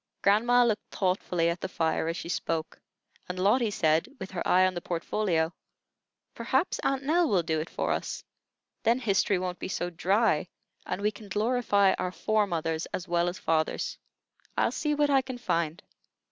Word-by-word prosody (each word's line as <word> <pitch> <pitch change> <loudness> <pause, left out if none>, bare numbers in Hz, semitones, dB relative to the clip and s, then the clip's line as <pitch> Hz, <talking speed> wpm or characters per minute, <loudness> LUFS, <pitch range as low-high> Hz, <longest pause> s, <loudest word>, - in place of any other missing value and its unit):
Grandma 240 +5 +5
looked 225 -3 -1
thoughtfully 180 -3 0
at 170 +1 -1
the - - -2
fire 160 -2 0
as 165 - -2
she - - -6
spoke, 165 -2 -3 0.5
and 180 - -4
Lotty 210 +5 +3
said, 160 -5 +2
with 190 - -7
her 185 - -4
eye 185 +1 +5
on 185 - +1
the 175 - -4
portfolio: 170 -1 -1 0.8
"Perhaps 260 +8 0
Aunt 270 0 0
Nell 325 +3 +2
will 185 -4 +2
do 160 -1 0
it 155 - -4
for - - -2
us. - - -3 0.6
Then 230 +1 +3
history 200 -5 +2
won't 180 0 -3
be - - -4
so 175 -1 -3
dry, 185 -1 +2 0.4
and 185 +3 -3
we 210 - +2
can 210 0 -13
glorify 210 -2 +2
our 180 - -1
fore 215 +2 +1
mothers 165 -2 -2
as 185 - -5
well 175 0 +1
as 180 - -6
fathers." 160 -1 -1 0.6
"I'll - - +2
see 300 -1 -1
what 290 0 +2
I 270 -1 +5
can 260 -1 -7
find. 170 -6 -1
190 Hz, 180 wpm, -28 LUFS, 170-225 Hz, 0.8 s, Grandma